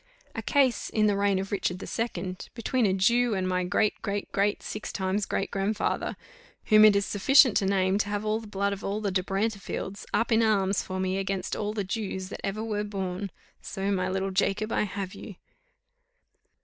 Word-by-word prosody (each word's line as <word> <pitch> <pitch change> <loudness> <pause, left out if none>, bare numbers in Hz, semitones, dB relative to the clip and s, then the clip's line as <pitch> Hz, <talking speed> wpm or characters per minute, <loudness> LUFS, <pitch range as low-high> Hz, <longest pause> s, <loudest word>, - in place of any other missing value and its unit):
A - - -4
case, 270 -4 +2
in 215 -1 +2
the 205 -1 +3
reign 200 -1 +2
of 195 +1 -4
Richard 185 -3 -1
the - - -7
Second, 185 -5 -4
between 240 0 +1
a 190 - +2
Jew 235 +4 +3
and 185 -1 -1
my 180 0 0
great, 205 +4 +1
great, 205 -2 -3
great, 200 +1 0
six 215 - -5
times 195 +1 -1
great 195 - -2
grandfather, 205 +2 -1 0.5
whom 215 -1 +6
it 210 -1 +7
is 200 0 +2
sufficient 250 +3 +5
to 195 - +1
name 190 0 +2
to 205 - 0
have 205 +1 -2
all 215 +1 +1
the 225 - -10
blood 200 0 -1
of 200 - -7
all 200 +2 -2
the 205 -2 -1
De 185 0 +1
Brantefields 200 0 -3
up 235 - +1
in 225 0 +5
arms 200 -3 +2
for 185 0 -5
me 190 +1 0
against 195 -1 -2
all 210 0 -2
the 210 -2 -2
Jews 190 -2 -4
that - - -7
ever 205 +2 -2
were 210 -2 -2
born. 195 -1 -4 0.3
So 195 +1 -3
my 185 -1 0
little 190 +1 -1
Jacob, 200 +3 0
I - - +1
have 195 -2 -5
you." 205 - -9
200 Hz, 205 wpm, -27 LUFS, 190-215 Hz, 0.5 s, it